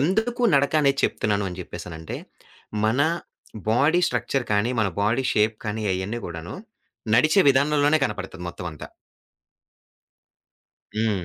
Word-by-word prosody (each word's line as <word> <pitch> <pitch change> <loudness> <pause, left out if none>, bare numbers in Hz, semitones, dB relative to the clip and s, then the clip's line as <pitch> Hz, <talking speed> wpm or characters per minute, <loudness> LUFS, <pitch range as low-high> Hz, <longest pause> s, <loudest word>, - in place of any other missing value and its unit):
ఎందుకు 220 - 0
నడకనేది 140 0 +3
చెప్తున్నాను 100 -2 0
అని 90 - -8
చెప్పేసనంటే, 85 -2 -7 0.7
మన 115 +5 +2 0.7
బాడీ 150 +9 +3
స్ట్రక్చర్ 125 +2 -1
కానీ, 105 +4 +2
మన 100 - +2
బాడీ 115 +5 +1
షేప్ 110 +1 +2
కానీ 105 +1 -3
అయన్నీ 100 +6 -3
కూడాను. 85 0 -7 0.6
నడిచే 155 +9 +5
విధానంలోనే 145 +2 +3
కనపడతది 95 -3 -7
మొత్తం 90 +1 -7
అంతా. 75 - -9 2.1
హ్మ్. 105 -5 0
110 Hz, 110 wpm, -24 LUFS, 95-140 Hz, 2.1 s, నడిచే